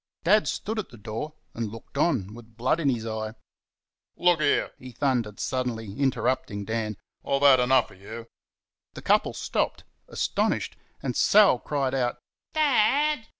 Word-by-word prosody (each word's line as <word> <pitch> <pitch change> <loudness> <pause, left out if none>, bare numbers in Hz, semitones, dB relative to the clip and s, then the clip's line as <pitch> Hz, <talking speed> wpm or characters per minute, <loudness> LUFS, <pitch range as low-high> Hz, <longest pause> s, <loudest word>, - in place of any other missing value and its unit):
Dad 205 +5 +4
stood 220 +1 -2
at 210 - -5
the 120 - -13
door 115 +9 -6 0.2
and 115 -3 -4
looked 115 +4 -12
on, 130 - +1
with 115 -1 -14
blood 130 +7 +1
in 150 -4 +2
his 115 -3 -1
eye. 110 0 -4 0.8
"Look 175 -3 +3
here!" 145 - +2
he 130 -1 -10
thundered 120 -6 -1
suddenly, 115 -5 -3
interrupting 130 -6 -1
Dan 110 -2 -2 0.3
"I've 140 0 0
had 135 -2 +7
enough 125 0 +3
of 95 - -17
you!" 115 +3 -8 0.7
The - - -9
couple - - +3
stopped, - - -2 0.2
astonished, - - -1 0.3
and 130 -3 -2
Sal 205 -11 +5
cried, 135 -2 -1 0.6
"DAD!" 290 -2 +2
130 Hz, 150 wpm, -26 LUFS, 110-150 Hz, 0.8 s, had